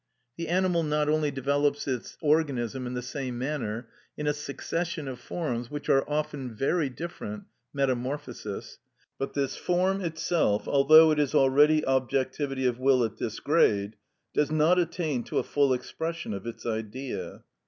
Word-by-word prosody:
The 170 -1 -4
animal 180 0 +2
not 150 -1 +1
only 155 -1 +2
develops 145 +2 0
its 130 -3 -3
organism 135 -5 +1
in 125 - -4
the 125 - -3
same 130 -1 -4
manner, 125 -4 -3 0.3
in 150 - -3
a 150 - +2
succession 155 +2 -4
of 130 -2 -6
forms 125 -7 -3
which 145 0 -6
are 135 - +5
often 145 -5 -3
very 140 +5 +1
different 125 -8 -6 0.3
(metamorphosis), 130 -5 -3 0.4
but 135 - -3
this 140 -2 0
form 185 +2 +1
itself, 160 - 0
although 155 +3 +7
it 150 - +1
is 145 0 +1
already 150 +3 +5
objectivity 130 +1 0
of 125 -1 +1
will 130 -1 +4
at 110 -2 -3
this 110 -2 -4
grade, 105 -10 +2 0.4
does 150 - +2
not 155 +4 +4
attain 160 -7 -1
to - - -3
a - - +2
full 140 -2 +2
expression 160 +2 -3
of 100 +3 -6
its 115 - -7
Idea. 115 +3 -4
140 Hz, 155 wpm, -28 LUFS, 125-155 Hz, 0.4 s, although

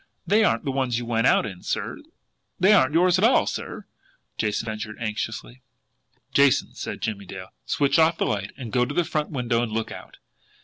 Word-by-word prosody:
They 210 +5 +4
aren't 210 - +1
the 135 - 0
ones 130 -3 0
you 120 - -4
went 115 0 +1
out - - +4
in, 95 -4 -7
sir - - -3 0.6
they 190 +4 +6
aren't 150 -6 +4
yours 180 +2 +4
at - - 0
all, 235 +4 +5
sir!" - - -5 0.5
Jason 105 0 -1
ventured 110 -1 -5
anxiously. 110 +2 -4 0.7
"Jason," 140 -2 +3
said - - -6
Jimmie 100 -3 -3
Dale, 95 0 -8 0.2
"switch 140 +3 +2
off 160 +1 +4
the - - 0
light, 100 -2 -2
and 120 -5 -7
go 125 - +3
to 140 +4 -3
the 175 - +3
front 150 -2 -2
window 120 -4 0
and 120 -2 -2
look 110 0 -2
out. - - -10
120 Hz, 195 wpm, -24 LUFS, 110-155 Hz, 0.7 s, they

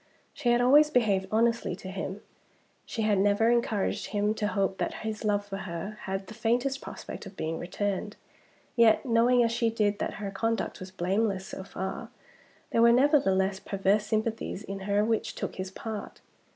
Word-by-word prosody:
She 255 -5 -1
had 240 0 +4
always 290 +5 +6
behaved 205 -8 +2
honestly 230 -3 +1
to 185 - -9
him; 190 +1 -5 0.7
she 225 - -2
had 210 -2 +3
never 205 +3 +3
encouraged 230 -4 0
him 210 0 0
to 215 -1 -1
hope 195 -2 -1
that - - -1
his 220 0 -4
love 205 -1 +1
for 195 -1 -5
her 195 +3 -6
had 195 0 -3
the 220 - -10
faintest 240 +5 0
prospect - - -8
of 195 - -13
being 160 +1 -3
returned. 200 +3 -3 0.6
Yet, 230 +2 +5
knowing, 240 +1 +4
as 230 - +1
she 230 0 +1
did, 210 -2 0
that - - -2
her 200 -2 -5
conduct 225 +3 -2
was 185 - -7
blameless 190 +2 0
so 190 - -7
far, 190 0 -5 0.6
there 230 - +3
were 235 0 +7
nevertheless 200 -8 +3
perverse 195 +2 +1
sympathies 220 -2 -2
in 195 -2 -6
her 205 +1 +3
which 225 0 -1
took - - -5
his 185 0 -4
part. 215 +2 -7
210 Hz, 180 wpm, -28 LUFS, 195-230 Hz, 0.7 s, were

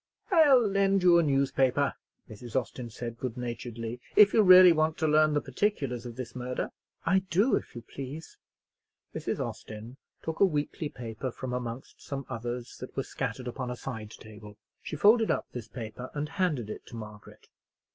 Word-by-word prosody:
"I'll 285 - +6
lend 195 -1 +2
you 175 -1 +7
a - - +5
newspaper," 135 -2 +2 0.3
Mrs. 120 +3 -3
Austin 125 -2 -7
said, 115 +1 -7
good 125 -2 -4
naturedly, 120 -1 -5
"if 210 -1 +7
you 220 - +6
really 185 -2 +9
want 155 -1 +1
to 160 - +1
learn 155 0 +4
the 145 - +2
particulars 135 - -1
of 120 - -8
this 125 -1 -7
murder." 125 0 -3 0.3
"I 190 - +4
do, 200 +9 +3
if - - -5
you 120 - -7
please." 140 +6 -8 0.8
Mrs. - - -3
Austin 110 +4 -6 0.3
took 160 0 -4
a - - +6
weekly 150 -2 -2
paper 120 0 -5
from 125 +1 -6
amongst 125 0 -6
some 140 -1 -5
others 120 0 -5
that - - -9
were - - 0
scattered 125 - -4
upon 125 +1 -4
a 125 - -3
side 110 -5 -6
table. 105 -1 -12 0.2
She - - -6
folded 220 +8 +5
up - - 0
this 120 -3 -7
paper 115 +1 -7
and 150 0 -2
handed 160 - -1
it - - -9
to - - -10
Margaret. 105 -2 -11
130 Hz, 175 wpm, -29 LUFS, 120-160 Hz, 0.8 s, really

